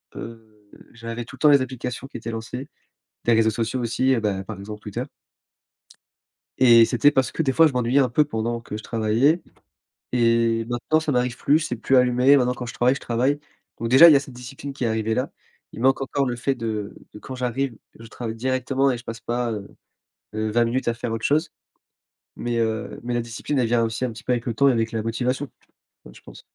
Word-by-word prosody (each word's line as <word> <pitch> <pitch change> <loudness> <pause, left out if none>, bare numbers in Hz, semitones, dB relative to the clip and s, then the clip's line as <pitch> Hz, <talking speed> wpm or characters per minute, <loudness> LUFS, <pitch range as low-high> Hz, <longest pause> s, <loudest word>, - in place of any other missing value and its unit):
heu, 110 -2 -11 0.2
j'avais 115 0 -6
tout 125 - -12
le - - -22
temps 150 - +5
les 140 -2 +6
applications 125 0 -5
qui 135 - -8
étaient 115 0 -6
lancées, 115 +4 -6 0.6
des 120 - +4
réseaux 110 0 +3
sociaux 115 +3 -2
aussi, 120 +3 +1
heu, 120 - 0
bah, 100 -3 -1
par 105 0 -8
exemple, 105 +2 -8
Twitter - - -5 1.5
et 120 -3 +7
c'était 125 +4 +3
parce 130 -3 0
que, - - -1
des 135 -4 +1
fois, 165 +4 +6
je 155 - +1
m'ennuyais 125 +1 +1
un 130 - +3
peu 150 +6 +3
pendant 115 -3 -3
que 110 -2 -7
je 110 - -7
travaillais 115 +10 +1 0.7
et 115 -1 +2
maintenant 120 +6 0
ça 155 -2 -1
m'arrive 125 -1 0
plus. 145 +5 +3
C'est 125 -6 -3
plus 130 +4 +1
allumer. 125 +2 +5
Maintenant 125 -2 +2
quand 125 0 -6
je 120 - -7
travaille, 125 +2 +3
je - - -7
travaille. 130 +5 0 0.4
Donc, 115 - -3
déjà, 135 +8 +9
il 160 - +8
y - - +7
a - - +3
cette 135 -2 -11
discipline 130 +3 -8
qui 135 - -4
est - - +2
arrivée 110 0 0
là. 130 +4 -2 0.4
Il - - -9
manque 135 +2 +3
encore 135 +1 -1
le 120 -1 -2
fait 135 +3 -1
de 110 -4 -4 0.2
de - - -10
quand 130 - -8
j'arrive, 125 0 -2 0.2
je 115 - -11
travaille 115 0 -6
directement 130 +2 0
et 120 - -4
je - - -11
passe 115 0 -6
pas, 120 0 -2
heu, 105 -2 -5 0.7
heu, 110 0 -1
20 120 +2 +3
minutes 125 +2 -1
à 120 - +1
faire 115 -1 -4
autre 115 - -4
chose. 155 +3 +1 0.9
Mais, 120 0 -3
heu, 110 -2 -2
mais 120 0 -2
la 120 - +1
discipline 115 +5 -3
elle 120 - +2
vient 115 0 +2
aussi 115 +2 -2
un 125 - -1
petit 110 - -12
peu - - 0
avec 120 -1 -2
le 120 - -2
temps 140 +4 +4
et - - +4
avec 115 -1 0
la 110 -2 -2
motivation 125 +5 -2 0.6
enfin, - - -13
je - - -15
pense. - - -13
120 Hz, 235 wpm, -23 LUFS, 115-130 Hz, 1.5 s, déjà